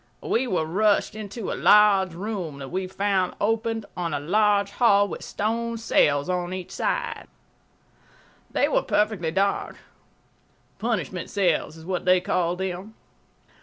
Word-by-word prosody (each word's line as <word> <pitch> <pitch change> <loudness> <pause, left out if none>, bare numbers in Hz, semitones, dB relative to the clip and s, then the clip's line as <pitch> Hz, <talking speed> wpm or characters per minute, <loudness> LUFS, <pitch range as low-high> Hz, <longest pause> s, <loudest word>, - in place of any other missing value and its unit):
We 255 +3 0
were 180 -7 0
rushed 205 +7 +2
into 215 0 -6
a - - -1
large 200 -4 +5
room 185 -6 -4
that 135 -1 -8
we 185 +1 -3
found 190 -1 0
opened 225 +1 -1
on 175 -2 -2
a - - -1
large 200 +5 +2
hall 205 -3 +4
with - - -7
stone 230 +2 -2
cells 145 -10 +2
on 180 0 -2
each 185 -2 -7
side. - - -2 1.2
They - - +1
were - - +2
perfectly 210 - 0
dark. 195 +4 -1 1.0
Punishment 185 - -2
cells 175 -5 0
is 160 - -12
what 185 0 -3
they 185 0 +5
call 180 -1 0
them. 190 +3 -5
195 Hz, 140 wpm, -25 LUFS, 180-215 Hz, 1.2 s, large